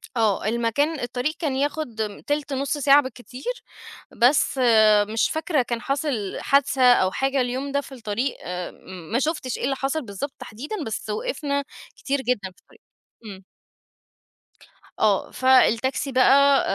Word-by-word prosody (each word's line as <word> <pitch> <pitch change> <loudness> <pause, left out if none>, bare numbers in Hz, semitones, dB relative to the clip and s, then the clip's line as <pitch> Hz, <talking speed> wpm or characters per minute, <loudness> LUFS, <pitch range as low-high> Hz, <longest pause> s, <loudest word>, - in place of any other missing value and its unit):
آه. 215 -4 +1
المكان 235 +7 0
الطريق 245 +5 -2
كان 290 -6 -1
ياخد 290 -3 -2 0.3
تِلت، 290 -1 -1
نُص 275 +2 -1
ساعة 285 +1 +6
بالكتير، 260 - -7 0.6
بس 265 +2 +3 0.5
مش 225 +1 +1
فاكرة 315 -2 0
كان 235 -1 -3
حصل 275 -8 -2
حادثة 280 -1 +2
أو 185 -5 +2
حاجة 270 +4 0
اليوم 260 +3 -3
ده 280 0 0
في 275 - -14
الطريق 240 +1 -3
آآ 180 0 -5
ام 180 -3 -12
ما 235 - +2
شُفتش 300 -4 -2
إيه - - -7
اللي 270 - 0
حصل 270 +4 -2
بالضبط 215 +8 -6
تحديدًا، 290 - -6
بس 220 0 -5
وقفنا 280 +6 -2 0.3
كتير 280 0 -2
جدًا 205 -7 -2
في - - -27
الطريق. 450 - -24 0.4
إمم. 195 -3 -10 1.6
آه، - - +1
فالتاكسي 260 +1 +2
بقى 275 +2 +5
265 Hz, 145 wpm, -23 LUFS, 230-280 Hz, 1.6 s, ساعة